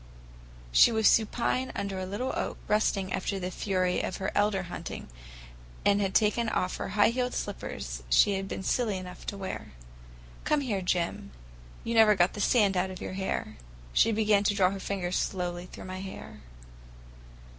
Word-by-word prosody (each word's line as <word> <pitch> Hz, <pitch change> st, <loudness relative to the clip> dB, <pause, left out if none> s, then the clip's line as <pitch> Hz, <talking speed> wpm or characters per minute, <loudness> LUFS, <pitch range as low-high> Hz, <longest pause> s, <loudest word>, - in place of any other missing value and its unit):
She 150 Hz, -, +7 dB
was 220 Hz, -1 st, +3 dB
supine 240 Hz, +3 st, +2 dB
under 200 Hz, -1 st, -3 dB
a 185 Hz, -, -4 dB
little 220 Hz, +7 st, -3 dB
oak, -, -, -3 dB
resting 200 Hz, -3 st, +1 dB
after 195 Hz, +1 st, -2 dB
the 180 Hz, 0 st, -4 dB
fury 185 Hz, -1 st, 0 dB
of -, -, -3 dB
her 190 Hz, -, -2 dB
elder 205 Hz, -2 st, +1 dB
hunting, 175 Hz, -, -7 dB, 0.8 s
and 205 Hz, 0 st, +4 dB
had 195 Hz, -1 st, -1 dB
taken 225 Hz, +1 st, +3 dB
off 180 Hz, -3 st, -1 dB
the -, -, -3 dB
high 205 Hz, +2 st, +4 dB
heeled 250 Hz, +1 st, -1 dB
slippers 65 Hz, -, -5 dB
she 200 Hz, -, +5 dB
had 195 Hz, 0 st, -3 dB
been 190 Hz, -, -5 dB
silly 215 Hz, -2 st, 0 dB
enough 180 Hz, -1 st, -9 dB
to 200 Hz, -, -3 dB
wear. 190 Hz, -, -6 dB, 0.7 s
"Come 300 Hz, -1 st, +2 dB
here, 215 Hz, -8 st, -1 dB
Jim. 175 Hz, -, -1 dB, 0.5 s
You 230 Hz, -, -2 dB
never 220 Hz, -2 st, +6 dB
got 180 Hz, -1 st, +3 dB
the 205 Hz, -, -4 dB
sand 205 Hz, -4 st, +3 dB
out 185 Hz, +1 st, +1 dB
of 185 Hz, -1 st, -7 dB
your -, -, -5 dB
hair." 190 Hz, 0 st, -3 dB, 0.4 s
She 225 Hz, -, +4 dB
began 210 Hz, -2 st, +3 dB
to 205 Hz, -, +2 dB
draw 185 Hz, -2 st, +4 dB
her 195 Hz, -, -5 dB
fingers 185 Hz, -2 st, -2 dB
slowly 180 Hz, -1 st, -2 dB
through -, -, -10 dB
my 185 Hz, 0 st, -6 dB
hair. 190 Hz, -, -8 dB
195 Hz, 175 wpm, -29 LUFS, 185-210 Hz, 0.8 s, She